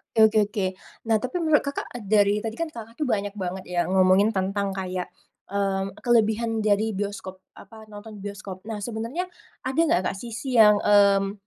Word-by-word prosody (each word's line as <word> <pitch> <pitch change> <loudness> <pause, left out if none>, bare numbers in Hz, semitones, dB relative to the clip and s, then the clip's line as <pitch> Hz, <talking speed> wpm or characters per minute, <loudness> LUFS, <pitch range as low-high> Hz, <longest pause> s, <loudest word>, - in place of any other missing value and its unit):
Oke 220 - +7
oke 220 - -1
oke. 205 -2 -2 0.4
Nah, 220 - +5
tapi 255 +11 -3
menurut, 315 -3 +3
Kakak, 280 - -4 0.2
dari 205 0 +3
tadi 220 +1 -4
kan, 335 +3 -3
Kakak, 230 -6 -10
tuh 295 - +1
banyak 205 -2 -1
banget 190 -2 -5
ya 175 -1 -1
ngomongin 190 +2 +4
tentang 200 -1 -1
kayak, 185 -2 -4 0.4
eee, 195 -1 -1 0.2
kelebihan 225 -1 +2
dari 215 +1 +1
bioskop, 200 -1 -5 0.2
apa 220 0 -14
nonton 210 0 -10
bioskop. 200 -2 -7
Nah, 220 - -3
sebenernya 230 - -4 0.4
ada 265 +4 -1
nggak, 190 - +2
Kak, - - 0
sisi 230 +5 -6
yang, 210 -3 +7
mmm, 200 -1 +4
210 Hz, 175 wpm, -25 LUFS, 195-225 Hz, 0.4 s, Oke